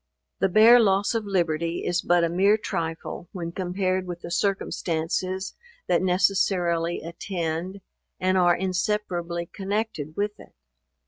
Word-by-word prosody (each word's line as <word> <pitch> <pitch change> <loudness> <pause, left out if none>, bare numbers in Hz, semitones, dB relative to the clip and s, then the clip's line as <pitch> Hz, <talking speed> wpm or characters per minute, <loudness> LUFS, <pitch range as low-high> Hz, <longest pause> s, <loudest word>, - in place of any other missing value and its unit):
The 195 - +2
bare 225 +6 +7
loss 200 -2 +2
of 225 -2 -1
liberty 170 -3 -1
is 175 0 0
but 175 -1 +3
a - - +3
mere 195 +5 +3
trifle 165 -3 -4
when 170 -2 -5
compared 185 +1 -1
with 175 -1 -6
the 170 - -7
circumstances 185 0 -1 0.3
that - - +2
necessarily 180 -2 +1
attend, 170 +2 -4 0.4
and 185 +1 +1
are 175 -2 +4
inseparably 180 -2 -2
connected 195 -5 -4
with 205 0 -2
it. - - -16
180 Hz, 130 wpm, -25 LUFS, 170-195 Hz, 0.4 s, bare